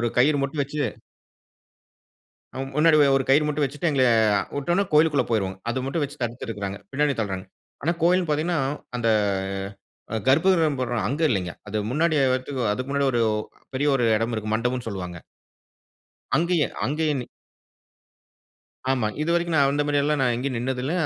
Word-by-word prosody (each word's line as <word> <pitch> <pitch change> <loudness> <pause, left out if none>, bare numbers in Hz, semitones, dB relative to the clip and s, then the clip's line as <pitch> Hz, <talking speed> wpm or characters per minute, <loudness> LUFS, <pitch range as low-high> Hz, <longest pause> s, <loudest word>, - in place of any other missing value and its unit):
ஒரு 120 - +1
கயிறு 145 +3 +4
மட்டும் 140 +1 -1
வச்சி 145 +2 -7 1.8
அம் 135 0 -4
முன்னாடி 155 +1 +5
ஒ 145 - +6
ஒரு 135 -1 +2
கயிறு 145 +3 +5
மட்டும் 150 0 0
வச்சிட்டு, 145 +5 -2
எங்கள 135 -3 +3 0.5
உட்டோன்ன 175 +7 +1
கோயிலுக்குள்ள 150 -1 +4
போயிருவோங்க. 95 -4 -1
அத 130 +2 -1
மட்டும் 145 +4 -1
வெச்சு 145 - -7
தடுத்து 120 +2 -4
இருக்குறாங்க. 100 -3 -4
பின்னாடி 145 +1 +1
தள்றாங்க. 95 -4 -2 0.4
ஆனா, 165 - +1
கோயில்ன்னு 175 -1 +3
பாத்தீங்கன்னா 160 +3 0 0.4
அந்த 115 -2 0 1.0
அ - - 0
கர்ப்பகிரகம் 160 0 +3
போட்றோம், 120 -3 -1
அங்க 145 +5 -2
இல்லங்க. 90 - -1 0.2
அது 110 - -2
முன்னாடி 160 +4 +1 0.2
வர்றதுக்கு 130 0 -2
அதுக்கு 130 +5 -4
முன்னாடி 140 0 +1
ஒரு 120 - +1 0.5
பெரிய 145 +3 +1
ஒரு 125 - +1
இடம் 115 +2 -1
இருக்கு. 110 -1 -3
மண்டபம்ன்னு 125 +2 -1
சொல்லுவாங்க. 90 -4 -5 1.2
அங்கேயே, 170 -2 +2 0.2
அங்கேயேனு 150 -3 0 1.7
ஆமா, 125 -5 +1 0.2
இதுவரைக்கும் 170 +1 0
நான் 140 -1 +4
அந்த 145 +1 +1
மாரியெல்லாம் 145 0 +1
நான் 125 -2 +3
எங்கேயும் 125 +1 -2
நின்னது 125 +1 -2
இல்ல. 140 +5 -2
135 Hz, 155 wpm, -24 LUFS, 120-150 Hz, 1.8 s, ஒ